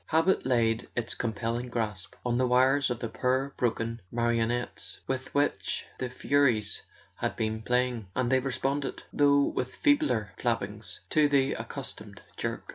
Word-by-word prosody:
Habit 165 -2 +2
laid 115 -3 +2
its 120 -1 -1
compelling 115 +2 -2
grasp 105 -6 -3
on 120 0 +1
the 130 - +3
wires 130 +3 +4
of 120 -1 -2
the 115 - -1
poor 130 +4 0
broken 115 -1 -1
marionettes 120 0 -1
with 130 0 -3
which 120 -10 0
the 125 - -2
Furies 125 -5 +1 0.4
had - - -1
been 110 0 -1
playing, 125 -2 0
and 130 -1 +1
they 130 - +5
responded, 135 +1 -2
though 140 -1 +5
with 125 -2 -2
feebler 285 - +2
flappings, 105 -5 -2
to 150 -1 +4
the 140 -1 +3
accustomed - - -7 0.2
jerk. - - -3
125 Hz, 145 wpm, -29 LUFS, 115-135 Hz, 0.4 s, they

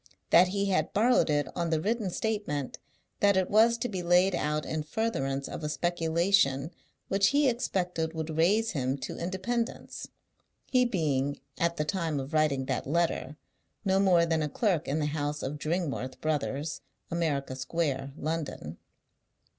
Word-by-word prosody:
That 175 +2 +7
he 200 +2 -1
had 190 - 0
borrowed 235 0 +3
it 145 -2 +1
on 170 -1 -1
the 160 -1 +1
written 215 +3 -1
statement 190 - -2 0.4
that 200 -1 +4
it 185 - +1
was 225 +3 +5
to 230 - -2
be 190 -6 -4
laid 180 +2 +4
out 150 -1 -1
in 155 0 -2
furtherance 145 -7 -2
of - - -7
a 150 - -1
speculation 165 -2 +1 0.4
which 195 0 +3
he 285 +4 +3
expected 180 -9 -1
would 160 -1 -4
raise 205 +8 +3
him 135 -3 -1
to 130 - -6
independence; 225 +7 -3 0.6
he 250 -1 +3
being, 145 - 0 0.2
at 170 0 +1
the 150 - 0
time 160 -3 -1
of 135 +3 -6
writing 150 -4 +2
that - - -2
letter, 155 -2 0 0.5
no 190 0 +3
more 180 -4 +4
than 165 -1 +1
a 150 - -1
clerk 180 -3 0
in 140 - 0
the 155 - 0
house 150 0 -2
of 145 +3 -4
Dringworth 155 -6 -2
Brothers, 150 0 -2 0.3
America 145 -6 -1
Square, 135 0 -2
London. 150 - -4
165 Hz, 160 wpm, -29 LUFS, 145-190 Hz, 0.6 s, That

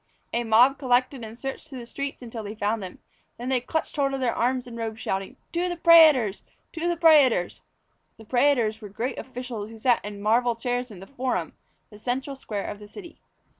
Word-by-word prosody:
A 235 - 0
mob 240 +5 +5
collected 255 -1 +1
and 220 +1 -9
searched 270 +4 -6
through 275 -4 -9
the 240 - -7
streets 280 +2 -5
until 230 -1 -6
they 210 0 -7
found 215 +1 -1
them. 185 -2 -8 0.4
Then 245 +2 -5
they 255 -2 +1
clutched 320 +6 -3
hold 275 -1 +1
of - - -4
their 250 -3 +1
arms 250 +1 0
and 240 -2 -9
robes, 225 -1 -4
shouting: 195 -3 -3
"To 350 +1 0
the 350 - -4
prætors! 310 - +6 0.3
To 335 0 -2
the 345 -1 0
prætors!" 290 - +4 0.6
The 220 - -14
prætors 245 -3 +2
were 210 - -8
great 240 +6 -4
officials 250 -5 -6
who 225 - -11
sat 240 +1 +2
in 205 0 -7
marble 230 +3 +2
chairs 245 +1 -2
in 195 -4 -11
the - - -9
Forum, 260 +2 -3 0.4
the 210 - -13
central 265 +4 -3
square 210 -6 -5
of 205 - -6
the 210 - -11
city. 340 - -12
245 Hz, 205 wpm, -25 LUFS, 220-270 Hz, 0.6 s, prætors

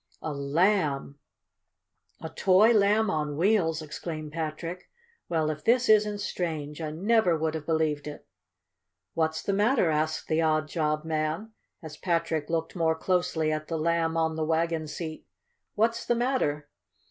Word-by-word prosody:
"A 155 - -3
Lamb! 145 -1 0 1.0
A 160 - -4
toy 195 +7 +4
Lamb 210 0 +3
on 150 -2 -2
Wheels!" 165 -4 +2
exclaimed 155 0 -6
Patrick. 165 +3 -5 0.4
"Well, 160 -2 +1
if 155 - -8
this 245 +2 +3
isn't 210 -1 +4
strange! 160 -6 -4
I 155 - -3
never 185 +2 +2
would 160 0 -1
have 160 -2 -6
believed 155 -3 0
it!" 150 - -8 0.9
"What's 160 -1 -1
the 200 - -1
matter?" 205 -3 +3
asked 155 +1 -1
the 160 +1 +1
odd 155 -1 +1
job 155 -1 -1
man, 160 +7 -2 0.3
as 155 -1 -9
Patrick 165 -3 -1
looked 165 +1 -2
more 165 -2 +2
closely 175 -2 0
at 155 0 -3
the 165 - -2
Lamb 165 0 0
on 160 -1 +1
the 160 - -1
wagon 160 0 0
seat. 155 +1 -7 0.5
"What's 230 +2 +1
the 240 - +1
matter?" 230 - 0
160 Hz, 150 wpm, -27 LUFS, 155-185 Hz, 1.0 s, toy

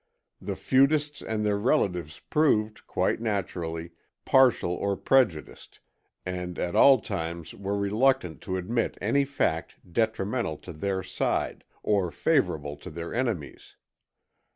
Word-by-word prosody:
The - - -4
feudists 145 +2 +2
and 110 -1 -2
their 100 -1 +1
relatives 90 - 0
proved, 110 -9 +2
quite - - 0
naturally, 85 -6 -3 0.3
partial 130 -9 +4
or 100 +2 -1
prejudiced, 115 -13 0 0.5
and 90 -1 -4
at 85 - -2
all 135 -2 +7
times 85 -1 -5
were 100 +1 -3
reluctant 100 - +1
to 95 - -2
admit 115 +6 -1
any 140 0 +2
fact 135 - -1 0.2
detrimental 110 -5 0
to 90 - -7
their 95 +4 -2
side, 95 0 -2 0.2
or 100 -4 +1
favorable 75 -3 0
to - - -9
their 85 +1 -6
enemies. 115 - -3
100 Hz, 125 wpm, -27 LUFS, 85-120 Hz, 0.5 s, all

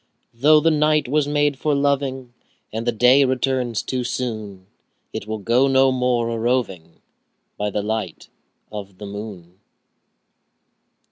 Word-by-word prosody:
Though 150 +6 +5
the 165 +2 +3
night 150 -2 +2
was 145 +2 +1
made 145 -1 +1
for 150 -2 +1
loving, 135 -3 -1 0.4
And 115 +2 -4
the - - +4
day 125 +5 +5
returns 130 -3 0
too 130 -1 -2
soon, 110 -6 -4
10 95 - -31 0.5
Yet 100 - -5
we'll 110 0 -3
go 120 +6 +2
no 135 0 +4
more 125 -2 0
a 115 -1 -3
roving 110 -9 -2 0.5
By 105 0 -2
the 105 0 -2
light 110 -5 -4 0.4
of 100 -3 -8
the 105 - -8
moon. 100 -3 -9
120 Hz, 145 wpm, -21 LUFS, 105-135 Hz, 0.5 s, Though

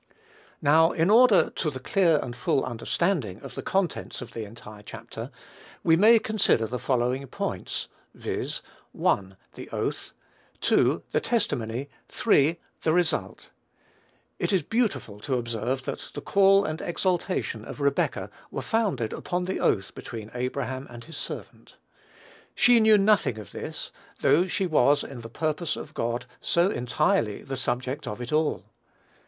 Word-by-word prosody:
Now, 160 +3 +5
in 165 +4 +2
order 235 -2 +6
to 155 - -1
the 130 -3 -6
clear 165 +3 +3
and 120 - -6
full 125 +2 +1
understanding 120 - -1
of - - -9
the - - -5
contents 190 -4 -1
of 125 -2 -8
the 115 -2 -4
entire 105 -1 -12
chapter, - - -8 0.5
we 160 - +5
may 220 +6 +7
consider 215 - +2
the 125 +3 -4
following 130 +1 0
points, - - -4 0.3
viz., - - -4 0.3
1, 95 -1 0 0.2
the - - -9
oath; - - -3 0.5
2, - - +3
the - - +2
testimony; 140 - -1 0.2
3, 165 -6 +3 0.2
the 160 - +2
result. 175 -1 -1 0.9
It - - 0
is 190 -5 +2
beautiful 215 - -1
to 130 +4 -1
observe 120 +2 -2
that - - -5
the - - -4
call 195 0 +5
and 155 +1 -3
exaltation 175 - -1
of - - -8
Rebekah 140 -1 0 0.2
were - - -4
founded 195 - 0
upon 180 0 -2
the 190 - -2
oath 100 -1 +1
between 110 -1 -8
Abraham 130 +1 -3
and 120 -1 -10
his 165 +4 -9
servant. - - -7 0.8
She 245 -1 +6
knew 220 -1 +6
nothing 200 - +3
of 105 - -9
this, - - -6 0.3
though 180 +4 +4
she 190 +1 0
was, 145 -4 +4
in 125 -3 -8
the 115 - -9
purpose 155 +5 -1
of - - -8
God, 120 +1 -2
so 175 +3 +2
entirely 115 -3 0
the 135 - -4
subject 130 +1 -2
of 105 - -4
it 120 +3 -5
all. 155 0 +1
140 Hz, 150 wpm, -26 LUFS, 120-180 Hz, 0.9 s, may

